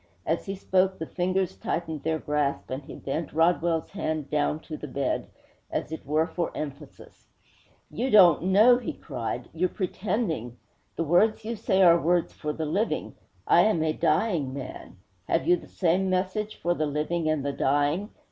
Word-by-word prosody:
As 165 +5 -1
he 195 - -3
spoke, 190 0 +1
the 160 - -4
fingers 185 +2 -1
tightened 160 -3 -3
their 160 0 0
grasp, 150 -3 -2
and 130 +2 -3
he - - -10
bent 145 +3 -4
Rodwell's 165 0 +1
hand 155 -7 -3
down 150 0 +1
to 155 - -7
the 150 - -7
bed, 135 0 -2 0.4
as - - -3
it 160 - -7
were 155 +2 +2
for 170 0 -3
emphasis. 145 -1 -9 0.6
'You 250 +4 -2
don't 180 - +6
know,' 215 +6 +6
he 245 - -4
cried. 125 -3 -5
'You're 180 +3 0
pretending. 185 - -2 0.4
The 165 - -1
words 210 +7 +3
you 230 +1 -3
say 190 -2 +2
are 170 -1 +6
words 175 0 +1
for 150 - -4
the 160 +1 -3
living. 195 +9 -1 0.3
I - - +6
am 190 -7 +2
a 155 -1 +1
dying 155 -6 0
man. 130 -7 -8 0.3
Have 165 - +1
you 180 - +6
the 175 - -10
same 185 +1 +1
message 190 +3 -1
for 175 - 0
the 155 -3 -1
living 155 +3 -1
and 155 -3 0
the 140 - -1
dying? 145 +9 +1
165 Hz, 175 wpm, -27 LUFS, 150-185 Hz, 0.6 s, don't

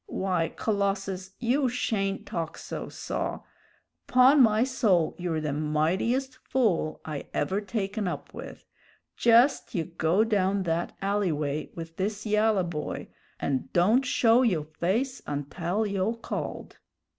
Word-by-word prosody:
Why, 180 -4 0
Colossus, 195 -2 -2
you 255 +3 +1
shayn't 195 -5 -1
talk 165 -1 -4
so, - - -6
saw. - - -4 0.7
'Pon 260 +3 +6
my 220 -1 +5
soul, 210 -11 +2
you're 170 -3 -1
the 150 -2 -2
mightiest 180 - 0
fool 210 -15 0
I 150 -3 -5
ever 195 +2 0
taken 205 -1 -2
up - - -5
with. - - -9 0.5
Jest 240 +4 +4
you 170 - +1
go 170 +4 +1
down 200 -3 +1
that 170 0 -2
alley 200 -2 +1
way 150 0 -2
with 165 -1 -8
this 205 +3 -2
yalla 210 -2 +3
boy, 160 -3 -4 0.3
and 135 -2 -2
don't 210 +10 +4
show 240 -1 +4
yo' 185 -12 +2
face 190 - -1
untell 165 +8 -2
yo' 200 +1 0
called!" 230 - -6
195 Hz, 135 wpm, -27 LUFS, 165-225 Hz, 0.7 s, Pon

